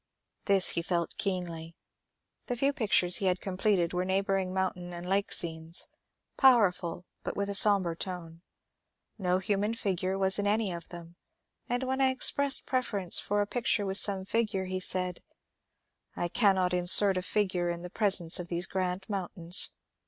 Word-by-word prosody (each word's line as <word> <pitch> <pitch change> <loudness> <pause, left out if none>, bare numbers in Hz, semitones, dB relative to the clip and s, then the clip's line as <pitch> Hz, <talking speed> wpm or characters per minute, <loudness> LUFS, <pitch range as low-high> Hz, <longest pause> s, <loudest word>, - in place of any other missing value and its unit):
This 195 -2 +2
he 170 - -1
felt 170 0 -3
keenly. 170 -4 -4 0.7
The 245 - -3
few 275 +3 0
pictures 190 -7 +2
he 195 - -2
had 185 0 0
completed 185 -2 -1
were 180 0 -1
neigh 190 +1 -1
bouring 195 -1 -2
mountain 185 -1 -3
and 175 +1 -8
lake 195 +2 -1
scenes, 160 0 -2 0.5
powerful 190 -9 +2 0.2
but - - -6
with 200 0 -2
a - - -4
som 200 0 +6
bre 170 -1 -3
tone. 165 -1 -7 0.8
No 180 -1 0
human 205 +3 -2
figure 190 -3 -3
was 190 0 +4
in 205 - -1
any 210 -1 0
of 170 -1 -8
them, 170 0 -11 0.5
and 245 +2 -2
when 265 +1 -2
I 265 - +4
expressed 270 +2 +3
preference 210 -8 0
for 205 0 -1
a - - 0
picture 225 -1 -1
with 195 0 +4
some 195 -2 +4
figure 210 -3 -2
he 185 0 -4
said, 180 -1 -1 1.0
^' - - -7
I 175 - -2
cannot 190 -4 +1
insert 180 +2 +6
a 185 - -2
figure 185 -2 -2
in 170 0 -5
the 180 - -9
presence 190 -7 +2
of 175 - -6
these 175 +1 -1
grand 185 0 -4
mountains. 180 -3 0
190 Hz, 175 wpm, -28 LUFS, 175-205 Hz, 1.0 s, som